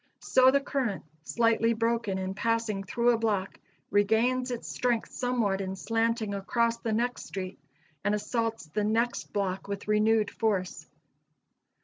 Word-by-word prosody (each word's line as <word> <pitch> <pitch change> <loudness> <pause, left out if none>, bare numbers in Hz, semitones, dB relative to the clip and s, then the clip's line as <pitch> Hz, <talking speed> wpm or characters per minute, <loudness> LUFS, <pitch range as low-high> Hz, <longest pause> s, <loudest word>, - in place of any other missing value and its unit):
So 260 0 +5
the 280 +2 +4
current, 260 -8 -2 0.2
slightly 230 +5 +2
broken 230 -3 0
in 190 0 -3
passing 230 -1 0
through 235 +5 +2
a 230 - +1
block, 205 -4 -1 0.3
regains 225 +5 +2
its 245 -2 -4
strength 240 -2 -1
somewhat 235 -6 0
in 190 0 -3
slanting 225 0 0
across 230 +4 0
the 225 - -3
next 240 +3 -1
street, 185 -1 -6 0.4
and 205 +1 +2
assaults 225 -1 -2
the 155 +7 -2
next 230 +3 0
block 195 -1 -2
with 200 0 -5
renewed 215 0 +3
force. 185 -7 -1
225 Hz, 140 wpm, -29 LUFS, 200-235 Hz, 0.4 s, So